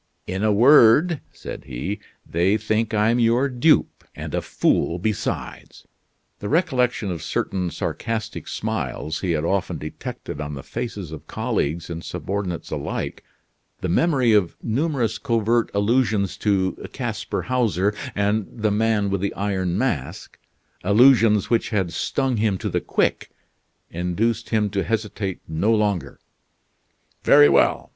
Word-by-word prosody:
"In 95 +3 -3
a 110 - +3
word," 140 - +6
said - - -9
he, 70 - -4 0.3
"they 90 +5 +2
think 110 +1 -1
I'm 110 +3 +2
your 120 +4 +3
dupe 140 +4 +2
and - - -7
a - - 0
fool 85 - +1
besides." 105 +3 -4 0.5
The 100 - -5
recollection 125 - +1
of 85 - -5
certain 90 -2 -2
sarcastic 110 +4 -4
smiles 80 +1 -3
he 90 -3 -1
had 80 0 -1
often 95 -2 -1
detected 75 -1 -7
on 75 0 -5
the 70 - -8
faces 100 -8 -5
of 80 - -9
colleagues 80 +4 -2
and 85 -1 -6
subordinates 95 -4 -4
alike, - - -4 0.6
the - - -2
memory 130 - +3
of 100 -6 +2
numerous 125 -2 0
covert 115 -2 +1
allusions 100 -2 +1
to 95 -3 0
Casper - - -3
Hauser, 105 -6 +1 0.2
and 105 0 +1
the 110 -2 -1
Man 105 -1 +1
with 100 -2 -1
the 100 - -2
Iron 95 -3 -1
Mask 100 - -3 0.5
allusions 110 0 +5
which 115 - +2
had 95 -6 -1
stung 135 -3 -1
him 105 -3 +1
to - - -3
the - - -1
quick - - 0 0.6
induced 90 +7 -1
him 105 -3 +1
to 100 -1 0
hesitate 105 -4 -3
no 80 +8 +1
longer. 105 -5 0 1.0
"Very 75 - +7
well! - - +2
105 Hz, 135 wpm, -23 LUFS, 95-115 Hz, 1.0 s, Very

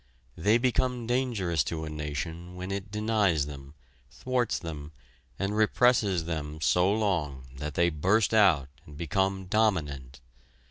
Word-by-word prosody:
They 105 +7 +3
become 125 0 0
dangerous 110 - 0
to 80 -1 -3
a - - -5
nation 80 +4 -5
when 90 +1 -6
it 100 +1 -4
denies 105 -7 +1
them, 70 0 -10 0.3
thwarts 125 - -1
them 75 -3 -7 0.4
and 100 +2 -2
represses 110 -5 +3
them 80 -2 -4
so 90 +5 +3
long 85 -11 -1
that 75 +1 -5
they 85 0 +3
burst 95 +9 +2
out 90 -11 +4 0.2
and 75 -1 -12
become 95 +4 -1
dominant. 75 - 0
90 Hz, 135 wpm, -28 LUFS, 75-105 Hz, 0.4 s, out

